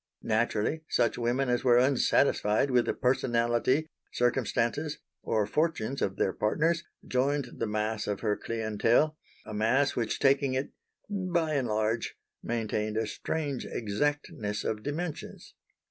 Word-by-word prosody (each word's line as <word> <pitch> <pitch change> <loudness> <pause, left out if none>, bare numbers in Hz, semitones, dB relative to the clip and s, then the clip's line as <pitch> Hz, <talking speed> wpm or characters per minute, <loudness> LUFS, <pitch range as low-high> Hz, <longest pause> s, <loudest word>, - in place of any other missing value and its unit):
Naturally 115 +6 0
such 120 +1 +1
women 120 +3 +1
as 125 0 +1
were 120 -2 +5
unsatisfied 130 -2 +3
with 125 -1 +3
the - - +1
personality, 125 +3 +2 0.3
circumstances, 125 +4 0 0.2
or 110 -2 +1
fortunes 140 -3 -1
of 95 - 0
their 95 - 0
partners, 165 +10 +1 0.2
joined 135 0 -1
the - - 0
mass 105 0 -2
of 105 -1 -2
her 105 -2 +1
clientèle, 115 +7 +1 0.3
a - - -7
mass 120 +7 +2
which 115 -3 -1
taking 135 -1 +3
it 130 +2 -2 0.4
"bye 180 -6 0
and 135 -4 +1
large" 110 +1 -1 0.3
maintained 110 -2 -2
a 110 - +1
strange 140 +5 -3
exactness 115 - -2
of 105 -1 -2
dimensions. 150 +5 -5
120 Hz, 130 wpm, -29 LUFS, 110-145 Hz, 0.4 s, were